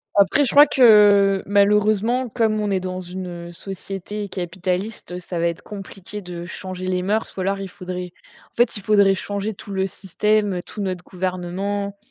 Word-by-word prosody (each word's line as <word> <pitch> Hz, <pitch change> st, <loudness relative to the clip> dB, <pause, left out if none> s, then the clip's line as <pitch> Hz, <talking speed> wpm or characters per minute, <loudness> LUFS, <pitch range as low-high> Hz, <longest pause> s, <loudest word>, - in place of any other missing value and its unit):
Après, 200 Hz, +8 st, +4 dB
je 260 Hz, -, 0 dB
crois 290 Hz, +1 st, +9 dB
que, 205 Hz, -6 st, +6 dB
malheureusement, 210 Hz, +4 st, +2 dB
comme 220 Hz, -2 st, +1 dB
on 205 Hz, -, -1 dB
est 190 Hz, -, +2 dB
dans 185 Hz, 0 st, -4 dB
une 175 Hz, -1 st, -7 dB
société 195 Hz, +3 st, -6 dB
capitaliste, 180 Hz, +1 st, -4 dB
ça 175 Hz, -1 st, -5 dB
va 170 Hz, -, +2 dB
être 170 Hz, 0 st, -3 dB
compliqué 200 Hz, 0 st, -9 dB
de 175 Hz, -2 st, -7 dB
changer 185 Hz, 0 st, -6 dB
les 180 Hz, -1 st, 0 dB
mœurs, 210 Hz, +4 st, 0 dB
ou 190 Hz, -, -2 dB
alors 195 Hz, +1 st, 0 dB
il 195 Hz, -, -5 dB
faudrait 180 Hz, -1 st, -6 dB, 0.4 s
en -, -, -42 dB
fait, 240 Hz, -1 st, +3 dB
il 205 Hz, -, -6 dB
faudrait 200 Hz, -1 st, +4 dB
changer 205 Hz, +2 st, -3 dB
tout 200 Hz, -, -11 dB
le 190 Hz, 0 st, 0 dB
système, 200 Hz, 0 st, 0 dB
tout 210 Hz, -, -7 dB
notre 185 Hz, -2 st, -3 dB
gouvernement. 190 Hz, +3 st, -3 dB
195 Hz, 175 wpm, -22 LUFS, 185-210 Hz, 0.4 s, crois